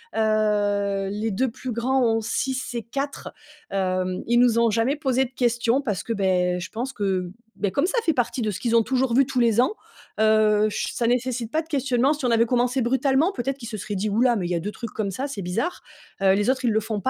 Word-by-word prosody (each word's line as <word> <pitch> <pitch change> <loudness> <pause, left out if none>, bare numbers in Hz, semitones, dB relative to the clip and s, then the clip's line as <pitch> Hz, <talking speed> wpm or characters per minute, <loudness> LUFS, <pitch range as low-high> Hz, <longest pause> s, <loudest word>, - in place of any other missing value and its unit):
Heu, 205 -2 +1
les 215 +2 -2
2 255 +7 0
plus 255 +1 -6
grands 260 +4 +1
ont 225 -1 +2
6 260 +3 -2
et 235 - -3
4, 275 +5 -5 0.4
hem, 185 -1 -1
ils 240 +1 +3
nous 240 -2 +4
ont 235 0 +4
jamais 230 +6 +1
posé 265 -3 +1
de 250 - -11
questions 240 +1 +1
parce 210 - -3
que, 230 - -2
beh, 180 -3 +1
je 180 - -6
pense 250 +4 -4
que, 190 -5 -1 0.3
bah, 205 - 0
comme 280 - +1
ça 395 - -1
fait 325 - +2
partie 245 -1 -1
de 215 - 0
ce 195 - -6
qu'ils 235 -1 +1
ont - - +5
toujours 260 0 0
vu 270 +3 +5
tous 260 -1 -2
les 230 -2 +3
ans, 260 - +1 0.5
heu, 215 -1 +4
je - - -3
s - - -5
ça 235 - 0
nécessite 245 -1 -1
pas 315 - +1
de 320 - -16
questionnement. 270 -2 +1
Si 295 -3 -5
on 245 - +2
avait 230 0 +4
commencé 250 +2 +1
brutalement, 265 +7 +2
peut-être 265 0 -3
qu'ils 235 -4 -8
se 215 - -5
seraient 205 +1 -5
dit: 205 +3 -1
«Hou 210 +3 +1
là, 245 -2 +4
mais 180 -4 -2
il - - -6
y - - +1
a - - 0
2 200 +5 -4
trucs 230 +1 -7
comme 205 -3 -3
ça, 260 +9 -3
c'est 275 -8 -6
bizarre», 195 - -2 0.4
heu, 190 -1 +5
les 205 +4 +1
autres, 260 0 0
ils 235 - +3
le 220 - +2
font 215 -1 -4
pas, 260 - 0
230 Hz, 260 wpm, -24 LUFS, 205-260 Hz, 0.5 s, ont